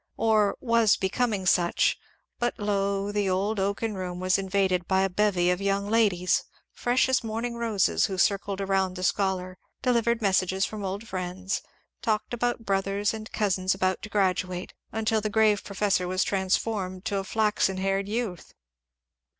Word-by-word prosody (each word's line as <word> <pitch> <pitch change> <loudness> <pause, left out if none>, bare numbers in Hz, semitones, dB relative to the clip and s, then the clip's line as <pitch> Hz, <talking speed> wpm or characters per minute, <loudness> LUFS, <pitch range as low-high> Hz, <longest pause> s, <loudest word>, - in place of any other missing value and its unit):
Or 215 -2 +2
was 230 -4 +3
becoming 200 0 -1
such 175 -1 +3 0.2
— - - -49
but 240 0 -1
lo! 200 -1 -1
the 205 -2 0
old 200 +3 0
oaken 200 +3 -1
room 180 -2 -5
was 185 +1 +2
invaded 190 -2 0
by 190 0 +3
a 195 - 0
bevy 180 -3 +2
of 180 +2 -1
young 200 +1 0
ladies, 200 -6 +2 0.3
fresh 245 +1 +2
as 260 -2 +1
morning 230 +2 -3
roses, 225 -5 +1
who 190 -2 -4
circled 200 +1 +1
around 190 -1 0
the 185 - -5
scholar, 185 -1 -1 0.2
delivered 235 -2 +2
messages 190 -2 +1
from 215 -2 -6
old 200 +4 -4
friends, 185 0 -3 0.4
talked 215 +1 -1
about 240 -1 -1
brothers 195 +1 0
and 220 0 -7
cousins 190 -3 +1
about 185 0 0
to 215 - -7
graduate, 185 -2 -1 0.2
until 220 0 0
the 215 - -2
grave 215 -1 +3
professor 200 -2 0
was 185 +1 +1
transformed 190 0 -1
to 205 -3 -1
a 195 - -1
flaxen 210 -2 +1
haired 195 +1 0
youth. 215 -6 -4
200 Hz, 160 wpm, -27 LUFS, 185-215 Hz, 0.4 s, was